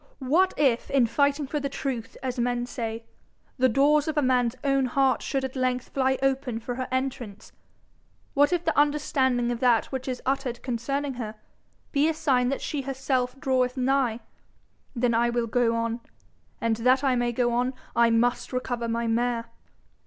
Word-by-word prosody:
What 325 +9 +2
if, 265 -5 +2
in 270 -3 +4
fighting 280 +5 +1
for 295 +3 -2
the 280 0 -3
truth 260 -5 -4
as 255 -1 -3
men 245 0 0
say, 230 -2 -5 0.5
the 255 0 +4
doors 290 +5 +3
of 310 -1 -2
a - - +4
man's 250 -2 +2
own 275 -1 +2
heart 265 +1 +2
should 270 -1 -2
at 265 - -6
length 255 -1 -1
fly 265 -1 +1
open 265 -3 0
for 245 +2 -5
her 255 +1 -4
entrance! 255 -6 -4 0.8
What 290 +2 +4
if 350 -1 0
the 320 - +1
understanding 265 -4 +2
of 240 - -3
that 240 -3 +2
which 265 -1 -4
is 255 -1 -3
uttered 260 -3 -2
concerning 275 +3 -2
her, 215 -1 -5 0.6
be 295 +2 +3
a 320 - -1
sign 255 -5 +2
that 275 - -2
she 290 - -3
herself 260 -1 -2
draweth 260 -2 +1
nigh! 255 -3 +1 0.7
Then 240 0 +1
I 235 +1 +2
will 240 0 0
go 230 0 +1
on. 230 0 -1 0.6
And 225 -1 0
that 255 +4 +3
I 265 -2 +3
may 240 0 +1
go 240 0 0
on, 250 +2 0 0.2
I 235 0 +5
must 235 +2 +1
recover 245 -2 -2
my 230 +1 -1
mare.' 230 0 -1
255 Hz, 180 wpm, -26 LUFS, 240-275 Hz, 0.8 s, I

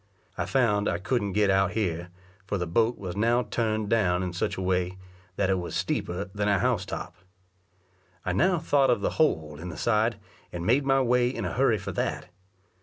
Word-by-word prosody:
I - - -3
found 105 -6 +2
I - - 0
couldn't 100 +1 -1
get 105 -1 +3
out 95 +1 +2
here, 90 -5 -2 0.4
for 100 - -1
the 90 - -2
boat 115 +8 +1
was 90 -3 -6
now 120 +4 +2
turned 110 -3 -1
down 95 -5 +2
in 90 -1 -3
such 90 - -2
a - - -3
way, 90 0 0 0.4
that 95 -1 +1
it 95 - +1
was 85 - -5
steeper 90 +4 -2
than 105 0 -1
a 100 -1 +3
house 115 -5 0
top. 90 - -5 1.1
I 90 - 0
now 180 - +3
thought 145 -4 +2
of 120 -4 +2
the - - 0
hole 80 - +1
in 90 +2 -6
the 80 - -7
side, 110 -1 +1 0.3
and 85 -1 -5
made 135 +6 +2
my 135 0 +4
way 125 0 +3
in 130 - -4
a - - -3
hurry 125 -3 +3
for 100 - -5
that. - - -3
105 Hz, 205 wpm, -27 LUFS, 90-120 Hz, 1.1 s, my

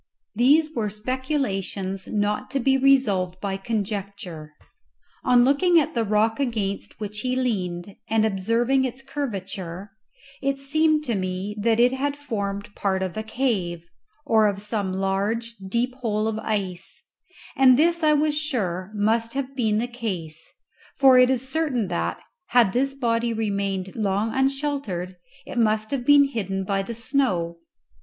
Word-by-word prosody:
These 295 +8 +4
were 220 -6 -1
speculations 210 -5 -3
not 210 +3 -1
to 275 - -1
be 270 +2 +3
resolved 215 -10 +2
by 195 0 -2
conjecture. 195 -6 -4 0.7
On 245 -1 +5
looking 335 +6 +4
at 295 - -1
the 235 - +1
rock 215 +2 +1
against 215 -7 -2
which 210 0 -5
he 255 +3 -1
leaned 195 -7 -2
and 220 -1 +3
observing 230 +6 +1
its 260 +1 -4
curvature, 195 - -5 0.5
it 275 0 0
seemed 305 +2 +2
to 245 - -1
me 185 +1 -3
that 225 +1 +2
it 245 +1 +5
had 280 +2 -2
formed 205 -7 -4
part 190 -1 -1
of 185 -2 -4
a 215 - -2
cave, 215 -8 -1 0.4
or 220 -5 +4
of 200 -1 -1
some 205 -2 -2
large, 200 +5 -1 0.2
deep 240 +4 0
hole 220 -4 -1
of 220 0 -2
ice; 195 -5 -3 0.5
and 255 -2 +6
this 340 +3 +3
I 305 -1 +4
was 300 0 +2
sure 205 - -2
must 225 +3 +1
have 275 -1 -3
been 220 -5 +1
the 230 - 0
case, 190 -10 -5 0.5
for 265 -2 +7
it 250 0 +6
is 260 0 0
certain 265 - -1
that, 175 - -1 0.3
had 235 -6 +4
this 275 +2 +1
body 235 -2 0
remained 200 -3 -2
long 210 +1 0
unsheltered, 265 -10 -1 0.3
it 245 - -4
must 215 -1 +1
have 255 -3 -2
been 290 -1 +8
hidden 195 -8 -2
by 195 +1 0
the 230 +4 -6
snow. 195 -10 0
225 Hz, 150 wpm, -24 LUFS, 195-265 Hz, 0.7 s, been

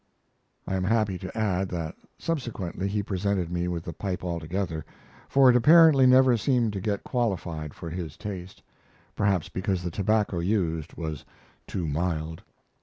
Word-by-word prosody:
I - - -3
am 95 - 0
happy 105 -2 +1
to 95 +2 -7
add 95 -3 0
that 85 -3 -4 0.2
subsequently 110 - -3
he 100 +1 -1
presented 95 -3 -1
me 90 0 -1
with 85 -2 -3
the 85 - -6
pipe 95 +2 -4
altogether, 85 -1 -3 0.5
for 135 -1 +6
it 125 - +7
apparently 150 0 +7
never 130 -1 +6
seemed 120 -2 +1
to 100 - -3
get 100 0 -2
qualified 85 - -2
for 85 - -7
his 85 -4 -5
taste, 95 -3 -7 0.5
perhaps 95 -5 +1
because 95 -1 -2
the 90 - -3
tobacco 100 -1 +1
used 85 -4 -1
was 80 -3 -5 0.4
too 90 -4 -3
mild. 80 +1 -2
95 Hz, 155 wpm, -27 LUFS, 85-110 Hz, 0.5 s, it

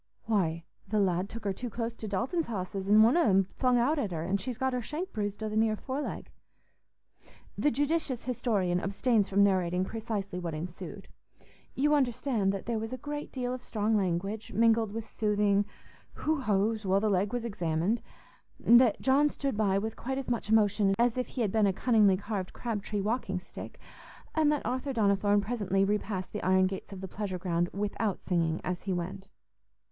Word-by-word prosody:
"Why, 170 -7 0 0.3
th' - - -12
lad 190 -2 +1
took 230 - -8
her 200 -1 0
too 245 +5 -5
close 230 +1 -3
to 220 - -6
Dalton's 250 - -1
hosses, 195 -2 -4
an' 215 +1 +7
one 230 +6 +5
on 345 - +4
'em 195 -1 +5
flung 250 +6 +1
out 285 +6 +2
at 215 - -1
her, 160 -2 -3
an' 195 +3 0
she's 235 +4 -5
got 265 0 0
her 250 - -1
shank 330 - -5
bruised 205 -1 -3
o' - - -1
the 215 - -4
near 220 0 +3
foreleg." 270 +6 -5 1.2
The 295 - +2
judicious 290 -2 -1
historian 205 -8 0
abstains 205 +2 +1
from 200 +1 +4
narrating 185 -2 +2
precisely 205 -4 -4
what 170 -3 -4
ensued. 165 +3 -7 0.7
You 295 +3 +3
understand 245 -6 +1
that 195 -1 -5
there 235 -2 -1
was 225 +1 -5
a 255 - -4
great 295 +3 -5
deal 250 -1 -2
of 255 - -5
strong 220 -2 0
language, 195 +2 -1
mingled 225 -1 +3
with 225 +1 -5
soothing 205 -2 +1 0.5
"who 310 -2 -1
ho's" 215 0 +1
while 195 0 +3
the 215 - 0
leg 195 0 +1
was 245 -1 -2
examined; 180 0 0 0.6
that 235 -2 +5
John 280 +3 +4
stood 275 -4 -3
by 200 -2 +2
with 220 +2 -2
quite 265 +2 -4
as 270 - -4
much 235 -2 -2
emotion 205 -2 +3
as 240 -1 +3
if 250 -1 -1
he 255 - -4
had 210 -4 +1
been 215 -1 +3
a 195 - +2
cunningly 210 -3 +4
carved 200 -2 -4
crab 225 -4 -3
tree 205 0 -3
walking 205 -3 -1
stick, - - -10 0.5
and 310 -2 +3
that 295 - -1
Arthur 255 +4 -2
Donnithorne 205 -2 +3
presently 200 -3 0
repassed 200 -2 -2
the - - -3
iron 185 0 +4
gates 190 +1 -4
of 190 -1 -8
the 190 - -5
pleasure 195 -1 -4
ground 175 -1 0
without 205 0 -2
singing 165 -3 +1
as 180 -1 -3
he 190 - -2
went. 190 +2 -5
210 Hz, 195 wpm, -30 LUFS, 195-240 Hz, 1.2 s, an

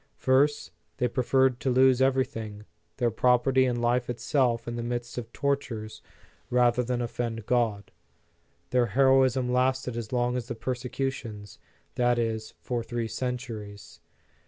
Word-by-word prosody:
First, 135 - +2 0.3
they 125 - +1
preferred 130 +1 +2
to 130 - -1
lose 130 0 +4
everything, 125 -6 0 0.3
their 120 -3 +1
property 125 +3 +3
and 120 -1 0
life 120 +1 +1
itself 120 -1 0
in 120 - -3
the 120 - -3
midst 120 0 -4
of 115 -1 -9
tortures, 130 -6 -3 0.5
rather 125 0 +3
than 125 0 -1
offend 115 -2 -4
God. 115 -5 0 0.8
Their 125 -1 +3
hero 135 -1 +6
ism 130 -1 0
lasted 130 -1 +1
as 115 -2 -5
long 125 0 +1
as 120 -2 -5
the 120 - -4
persecutions, 120 -4 -4 0.3
that 120 0 +2
is, 110 -2 -2
for 120 -2 -2
three 115 0 -3
centuries. 110 -4 -6
120 Hz, 140 wpm, -27 LUFS, 115-130 Hz, 0.8 s, hero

